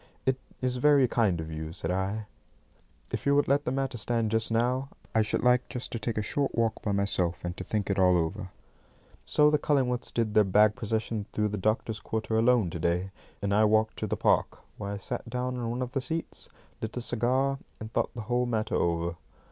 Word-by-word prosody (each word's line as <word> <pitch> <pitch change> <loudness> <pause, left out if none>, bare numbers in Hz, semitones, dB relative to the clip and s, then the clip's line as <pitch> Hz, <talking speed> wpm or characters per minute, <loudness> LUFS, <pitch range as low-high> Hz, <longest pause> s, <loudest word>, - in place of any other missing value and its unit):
"It 130 0 +1 0.2
is 125 0 0
very 140 0 +5
kind 105 -8 +1
of 80 0 -5
you," 80 +1 -5
said 85 -1 -3
I. 95 +4 -1 0.9
"If - - -3
you 140 - +5
would 145 - +3
let 140 +2 +2
the - - 0
matter 135 -2 -2
stand 115 -1 0
just 110 0 +1
now, 125 +4 +1 0.2
I 110 - +4
should 105 - -1
like 125 0 +3
just 125 - -5
to 115 - -3
take 115 0 -3
a 105 - +1
short 140 +5 -1
walk 115 -1 0
by 105 - -1
myself, 100 -3 +1
and 90 0 -3
to - - -4
think 105 0 -2
it 100 -1 0
all 90 -1 +5
over." 95 +4 -2 0.8
So 150 0 +4
the 150 - +3
Cullingworths 130 -5 0
did 115 -3 0
their 105 - +6
bag 105 +2 +4
procession 110 -2 -2
through 105 0 +1
the 105 - -3
doctors' 110 +2 0
quarter 110 +1 -2
alone 115 -5 +3
to 85 - -5
day, 90 +4 0 0.3
and 100 0 +1
I 105 +1 +5
walked 110 +1 +2
to - - -2
the - - -2
park, - - +2 0.2
where 100 -1 -4
I 100 - -3
sat 100 - -5
down 125 0 -2
on 120 -2 -2
one 120 +2 -2
of 125 - -5
the 135 - -1
seats, 160 +6 -5 0.3
lit 110 +2 -4
a - - -1
cigar, 130 +4 +1 0.2
and 110 0 -8
thought - - 0
the 115 - -4
whole 125 +2 0
matter 110 -2 -1
over. 85 0 0
110 Hz, 220 wpm, -28 LUFS, 100-125 Hz, 0.9 s, their